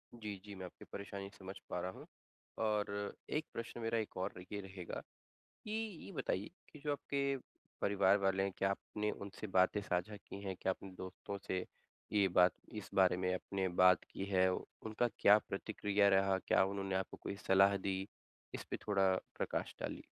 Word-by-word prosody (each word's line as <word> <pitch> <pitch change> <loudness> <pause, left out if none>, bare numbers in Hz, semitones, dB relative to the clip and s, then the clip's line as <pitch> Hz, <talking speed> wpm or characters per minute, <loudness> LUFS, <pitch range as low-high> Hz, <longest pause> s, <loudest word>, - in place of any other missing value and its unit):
जी, 105 -3 -5
जी, 105 - -8
मैं 95 -1 -6
आपकी 90 - -11
परेशानी 100 -1 -5
समझ 95 0 -7
पा 90 - -1
रहा 90 - -2
हूँ, - - -11 0.5
और 105 -2 0 0.2
एक 155 +1 0
प्रश्न 115 +1 -5
मेरा 115 0 +1
एक 110 -2 -2
और 95 +2 -1 0.2
ये 105 - -2
रहेगा, 95 -2 -6 0.6
कि 210 - -6
ये 215 -4 -3
बताइए 105 - -1 0.2
कि 150 - -10
जो 150 - +2
आपके 140 -1 0 0.4
परिवार 100 -1 +5
वाले 95 0 +2
क्या 95 +1 +1
आपने 105 +2 -2
उनसे 100 +2 -6
बातें 95 +1 +4
साझा 90 +3 -1
की 100 0 -9
हैं? 95 -1 -2
क्या 95 - +2
अपने 95 +1 -9
दोस्तों 95 +2 -5
से 90 -2 0 0.5
ये 100 -2 +5
बात 90 0 +6 0.2
इस 105 -2 -6
बारे 95 -2 +5
में 90 0 +1
आपने 95 +1 -1
बात 90 -1 +7
की 95 - -4
है? 95 -2 +4
उनका 110 +5 -2
क्या 105 +1 +8
प्रतिक्रिया 100 0 +2
रहा? 95 -1 +4
क्या 95 - +4
उन्होंने 95 0 -2
आपको 95 0 -1
कोई - - -3
सलाह 95 +1 +6
दी? 95 0 -2 0.5
इस - - -4
पे - - 0
थोड़ा 95 -2 +4 0.2
प्रकाश - - -1
डालिए। - - -3
100 Hz, 180 wpm, -37 LUFS, 95-105 Hz, 0.6 s, क्या